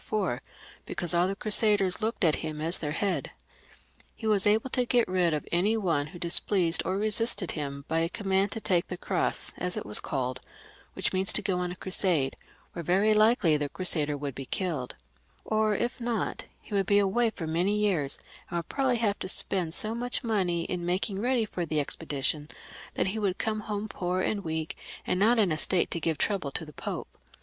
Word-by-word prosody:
before^ 190 - -1 0.5
because 175 0 -1
all 175 +1 +3
the 195 - -2
Crusaders 205 -2 +4
looked 220 +2 -2
to 165 -5 +5
him 155 -1 -5
as 165 +3 +1
their 150 -2 -3
head* 195 +3 -1 0.9
He 225 - -9
was 210 -2 +3
able 220 +5 +2
to 250 - +1
get 240 -2 +3
rid 180 -2 +1
of 150 -1 -3
any 200 +6 +2
one 165 -8 0
who 165 - -11
displeased 175 0 +2
or 185 - -1
resisted 215 -2 +5
him 140 -2 -5
by 160 +1 0
a 165 0 0
command 195 0 0
to - - -3
take 180 -5 +1
the 180 - -5
cros^^ - - -1
as 180 0 -2
it - - -4
was 105 +1 +2
called; 130 -3 -3 0.5
which - - -2
means 190 +2 +3
to - - +4
go 190 -3 0
on 180 0 -2
a - - -6
crusade^ 180 -8 +2 0.4
where 170 - -5
very 195 +6 +3
likely 215 -7 +4
the 145 -1 -3
crusader 150 -5 +1
would 140 -1 -5
be 135 +1 -7
killed, 160 -10 -2 0.5
or 215 -1 +1
if 240 +4 -2
not, 235 -1 -2
he - - -12
would 195 -2 +1
be 200 - +4
away 205 +4 +2
for 180 -6 -7
many 175 +6 +1
years, 180 -10 +1 0.3
and 175 - -3
would 170 - -5
probably 265 -3 +1
have 210 -3 0
to 185 - -3
spend 180 -4 -1
BO 215 +1 -2
much 245 +3 -2
money 185 -7 0
in 180 +1 -3
maMng 190 +3 -1
ready 245 -1 +1
for 180 -4 -4
the 155 -2 -1
expedition 150 0 -1 0.5
that - - +1
he 220 +3 -3
would 195 -3 -1
come 215 -1 -1
home 210 0 -4
poor 180 -2 -2
and 200 +1 -1
weak, 160 -1 -3 0.3
and 180 - 0
not 230 +4 +4
in 205 -6 +3
a 155 - -1
state 185 -2 +2
to 170 - -1
give 160 -1 -1
trouble 195 -7 -1
to 160 +4 -5
the 150 - -13
Pope. - - -5
185 Hz, 210 wpm, -28 LUFS, 165-210 Hz, 0.9 s, to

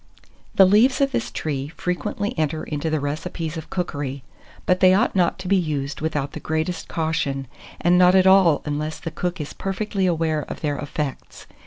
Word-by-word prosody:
The 195 - +8
leaves 220 +7 +4
of 275 -1 +2
this 240 -3 -1
tree 140 -3 -3
frequently 205 +3 -2
enter 155 -1 -1
into 150 +1 -3
the 155 -1 0
recipes 155 +3 -4
of 160 -1 -7
cookery; 145 -7 -3 0.4
but 180 0 +2
they 185 0 +6
ought 225 +2 +1
not 180 -2 +2
to 185 - -7
be 200 - +3
used 145 -5 -2
without 145 -3 -2
the - - -7
greatest 160 +3 -2
caution, 155 -4 -1 0.3
and 175 +1 +4
not 180 +1 +6
at 190 -1 +5
all 190 -5 +5
unless 150 +1 -3
the 165 - -5
cook 180 +2 -3
is 150 - -5
perfectly 195 0 -2
aware 160 -3 0
of - - -8
their 145 -2 -1
effects. 145 -1 -5
165 Hz, 185 wpm, -23 LUFS, 150-185 Hz, 0.4 s, The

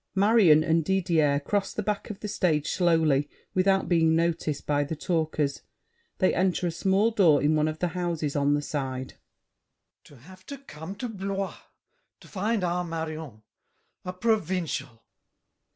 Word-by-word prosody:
[Marion 195 -6 +5
and 165 0 +2
Didier 165 -6 +2
cross 200 +6 -1
the 215 - -2
back 205 +1 -3
of 210 - -8
the 210 - -4
stage 160 -7 0
slowly 160 -5 +2 0.2
without 190 +1 +2
being 160 -2 +3
noticed 165 -3 -1
by 145 -1 +1
the 145 +3 -4
talkers; 155 -3 -1 0.6
they 185 - +2
enter 185 0 +1
a 175 - 0
small 195 +6 +1
door 175 -10 +4
in 150 +3 +2
one 155 0 +2
of 155 0 -3
the 180 +2 -1
houses 170 -4 -3
on 145 0 +2
the 145 - -2
side. 130 -3 -4
GASSÉ. - - -44
To 145 - -16
have 185 +9 -16
to 280 - -7
come 185 - -9
to 245 +5 -5
Blois 195 -2 -4 0.6
To - - -16
find 210 +1 -1
our 180 0 0
Marion, 160 -8 -6 0.6
a 180 - -4
provincial! 180 - -2
170 Hz, 160 wpm, -26 LUFS, 150-190 Hz, 0.6 s, Marion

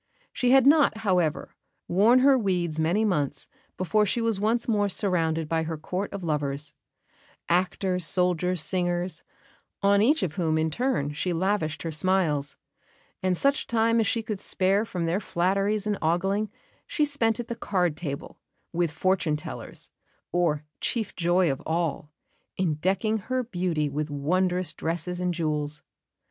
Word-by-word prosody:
She 250 - +1
had 265 0 +6
not, 285 -5 +5
however, 180 -6 +1 0.3
worn 220 +8 +5
her 275 +1 +6
weeds 180 -8 0
many 175 +8 +2
months 145 -8 -1 0.3
before 210 +4 +2
she 210 +3 0
was 225 -3 0
once 225 +3 +1
more 205 -3 +2
surrounded 165 -5 0
by 165 +1 0
her 160 0 -3
court 185 +6 -4
of 200 -2 -6
lovers 150 -2 -1 0.7
actors, 180 +1 0
soldiers, 180 -1 +2
singers, 175 -1 -1 0.6
on 200 0 +4
each 290 +8 +3
of 155 -4 -3
whom 160 -3 +1
in 160 0 0
turn 195 - -1
she 175 +4 -2
lavished 170 -2 -1
her 165 - -3
smiles; 160 -4 0 0.7
and 185 -1 +1
such 280 - +1
time 230 0 +2
as 220 - +2
she 230 - 0
could 215 -3 -4
spare 195 +4 +2
from 180 -6 -3
their 170 +4 0
flatteries 195 +3 0
and 210 -2 -1
ogling 195 +6 0 0.4
she 300 - +1
spent 235 -7 +1
at 240 - -4
the 235 - -4
card 180 -8 0
table, 145 -4 -6 0.3
with 170 0 +1
fortune 165 0 0
tellers, 150 0 -6 0.4
or, 165 -4 +1 0.2
chief 225 -4 -2
joy 175 -1 +2
of 135 +2 -4
all, 160 -2 -2 0.5
in 180 -4 +1
decking 195 +8 0
her 255 +5 -2
beauty 175 -8 -1
with 150 +2 -3
wondrous 180 +5 0
dresses 175 +2 -3
and 180 -1 -1
jewels. 150 -2 -2
180 Hz, 155 wpm, -26 LUFS, 160-210 Hz, 0.7 s, had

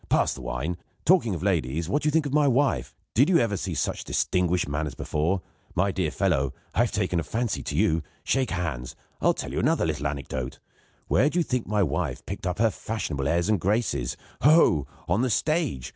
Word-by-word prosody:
Pass - - +3
the 70 - -9
wine. 75 +7 -3 0.3
Talking 160 - +4
of 85 - -6
ladies, 80 -4 0
what 145 +10 +1
do - - 0
you - - +3
think 160 0 +2
of 140 - -3
my 150 -1 +4
wife? 125 - +1 0.2
Did 135 +8 +4
you 180 - +5
ever 115 -7 +1
see - - -3
such - - -1
distinguished 90 -2 +1
manners 75 +1 -2
before? 85 +5 -1 0.3
My 100 +3 +2
dear 90 -4 0
fellow, 75 -8 0 0.2
I - - -2
have 120 -1 +3
taken 95 -5 0
a - - -1
fancy 115 +7 -2
to - - -4
you. 80 +1 +2 0.2
Shake 130 -2 +1
hands. 80 -9 -3 0.3
I'll - - +3
tell - - -5
you - - -1
another - - +2
little 75 - -1
anecdote. 65 -2 -4 0.5
Where 145 - +3
do 170 - -3
you 175 - +4
think 125 -5 -2
my 105 -1 +2
wife 80 0 -2
picked - - -5
up 90 - -1
her 115 +1 +3
fashionable 80 -10 -3
airs 85 +3 +1
and 105 -3 +2
graces? 100 - 0 0.2
Ho! 140 - +6
ho! 85 - +5 0.2
On 95 +7 +2
the 130 - +1
stage! 135 - 0
90 Hz, 215 wpm, -26 LUFS, 75-120 Hz, 0.5 s, Ho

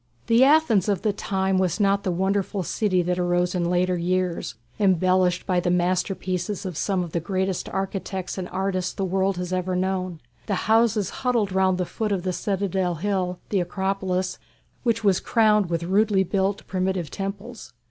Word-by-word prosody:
The 230 +2 +5
Athens 270 - +4
of 195 -3 0
the 210 -2 +1
time 190 -1 0
was 185 +2 0
not 200 -1 +3
the 190 - -2
wonderful 190 +2 0
city 185 0 +1
that 180 +1 -1
arose 175 0 +1
in 175 -2 0
later 180 +1 +2
years, 180 -4 -1 0.2
embellished 185 -2 +2
by 180 -2 +1
the 175 - 0
masterpieces 185 +2 -1
of 185 -3 -4
some 190 +2 0
of 170 - -7
the 170 - 0
greatest 190 +1 -2
architects 190 -1 -3
and 185 -2 -5
artists 185 -1 -2
the 195 - -2
world 190 0 0
has 180 0 -3
ever 185 0 -1
known. 185 -2 -2 0.3
The - - 0
houses 220 -3 +3
huddled 235 -6 +1
round 190 -1 +2
the 180 - -1
foot 215 +3 -3
of 190 -3 -1
the 185 -1 -1
citadel 190 -2 -1
hill 180 0 -1
the 200 - +1
Acropolis 185 0 -2 0.4
which 230 -2 0
was 195 -3 +3
crowned 210 -4 +3
with 170 -1 -1
rudely 195 +2 +3
built 195 +2 -1
primitive 185 -4 -2
temples. 200 - -6
190 Hz, 175 wpm, -24 LUFS, 180-200 Hz, 0.4 s, The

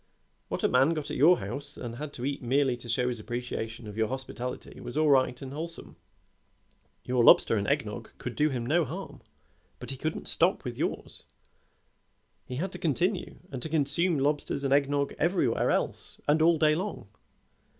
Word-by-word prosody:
What - - -4
a - - +5
man 135 +6 +3
got 150 -1 -4
at - - -3
your 165 +7 +6
house 120 +9 -5
and 120 -1 -6
had 150 +1 -5
to 125 - -5
eat 140 0 -2
merely 130 +1 +2
to 120 0 -12
show 125 +2 +1
his 120 -2 -2
appreciation 115 0 -5
of 105 -1 -8
your 110 -1 +2
hospitality 130 -1 -6
was 120 - -7
all 155 -1 +4
right 130 -2 +3
and 135 0 -7
wholesome. 165 +3 -7 1.1
Your 125 -1 +2
lobster 115 - +7
and 100 -2 -1
egg - - +1
nog - - -7
could - - -6
do 150 +1 +2
him 125 -4 -3
no 165 +7 +3
harm, - - -7 0.6
but - - -6
he 135 - -5
couldn't 155 +4 -3
stop 180 +4 +5
with 120 -1 -4
yours; - - -4 1.3
he 125 - -5
had 180 +8 -2
to - - -7
continue, 175 +5 0 0.2
and 130 - -5
consume 160 +3 +1
lobsters 140 0 0
and 135 0 +2
egg 140 -1 +3
nog 140 -1 0
everywhere 160 -9 +1
else - - -2
and 150 +2 +3
all 165 +1 +5
day 155 -1 +4
long. 185 - -4
140 Hz, 190 wpm, -28 LUFS, 125-155 Hz, 1.3 s, lobster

